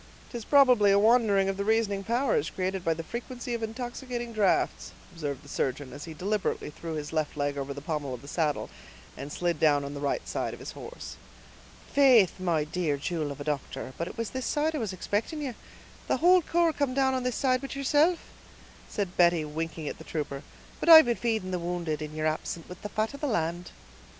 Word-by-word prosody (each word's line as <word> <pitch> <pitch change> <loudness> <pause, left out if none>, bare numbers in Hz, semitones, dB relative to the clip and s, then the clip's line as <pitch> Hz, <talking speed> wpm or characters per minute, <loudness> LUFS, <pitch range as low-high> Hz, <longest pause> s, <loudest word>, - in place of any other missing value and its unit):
"'Tis 235 -2 -5
probably 250 -8 +6
a 200 - +5
wandering 210 -3 +4
of 195 0 -1
the 200 - -1
reasoning 210 -2 +1
powers, 270 - +1
created 185 -1 -3
by 165 - +1
the 165 0 -2
frequency 240 +4 -5
of 235 - -2
intoxicating 240 +1 -5
drafts," 210 -3 +1 0.2
observed 145 -4 -4
the - - -15
surgeon, 135 -1 -2
as 145 - -8
he 165 - -8
deliberately 200 -2 -2
threw 165 +1 -6
his 150 0 -5
left 155 -1 -1
leg 145 0 0
over 140 0 -4
the 140 0 -6
pommel 150 -4 -3
of 120 - -13
the - - -11
saddle, 150 -1 -1 0.4
and 140 +2 -7
slid 175 -2 -1
down 145 -2 +3
on 140 - -6
the 145 - -6
right 140 -1 -2
side - - -2
of - - -16
his - - -7
horse. 485 +2 -9 0.8
"Faith, 250 -10 +5
my 170 -4 +1
dear 155 -1 -1
jewel 155 0 -2
of 140 - -8
a - - -4
doctor, 145 -2 -4
but 170 - -3
it - - -9
was 230 -1 -3
this 260 -1 -3
side 310 +1 +1
I - - -1
was 220 -5 -2
expicting 205 - -2
you; 275 -4 -3 0.5
the - - +2
whole 360 +2 +6
corps 335 0 +2
come 280 -4 -1
down 265 -1 +3
on 260 - 0
this 250 -1 -1
side 255 -2 +2
but 275 0 -6
yeerself," 295 +5 +3 0.7
said 195 -3 -3
Betty, 170 -3 +4
winking 160 0 -4
at - - -5
the - - -9
trooper; 145 -3 -4 0.4
"but - - 0
I've 320 -2 +11
been 240 -1 +1
feeding 220 -6 -1
the 180 - -1
wounded, 170 -3 -3
in 155 0 -6
yeer 155 0 -2
absence, 155 +1 -2
with 180 - -10
the 210 - -5
fat 215 +5 -1
of 280 - -9
the 295 - 0
land." 175 -5 -1
190 Hz, 220 wpm, -28 LUFS, 155-245 Hz, 0.8 s, I've